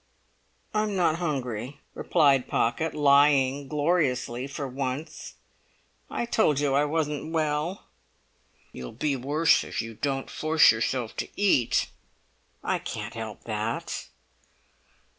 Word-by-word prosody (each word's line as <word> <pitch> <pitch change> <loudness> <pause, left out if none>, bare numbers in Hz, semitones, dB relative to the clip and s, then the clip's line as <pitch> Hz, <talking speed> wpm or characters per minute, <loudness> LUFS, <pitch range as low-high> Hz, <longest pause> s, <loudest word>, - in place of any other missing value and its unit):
"I'm 215 -1 0
not 170 -3 +2
hungry," 135 -5 -3
replied 135 -4 +3
Pocket, 155 +8 0
lying 140 -1 +4
gloriously 145 -5 0
for 140 0 -5
once. 135 +3 -5 0.7
"I - - -2
told 185 - +2
you 145 -2 +1
I 145 +2 +3
wasn't 150 0 -2
well." 155 +3 -1 0.9
"You'll 65 -1 -8
be 140 +5 -1
worse 145 +5 +3
if - - -5
you 115 0 -4
don't 135 +3 -2
force 155 0 +4
yourself 115 +1 -2
to - - -2
eat." 185 - +2 0.7
"I - - 0
can't 105 0 -6
help 110 -2 -7
that." 110 +1 -3
140 Hz, 115 wpm, -27 LUFS, 125-155 Hz, 0.9 s, lying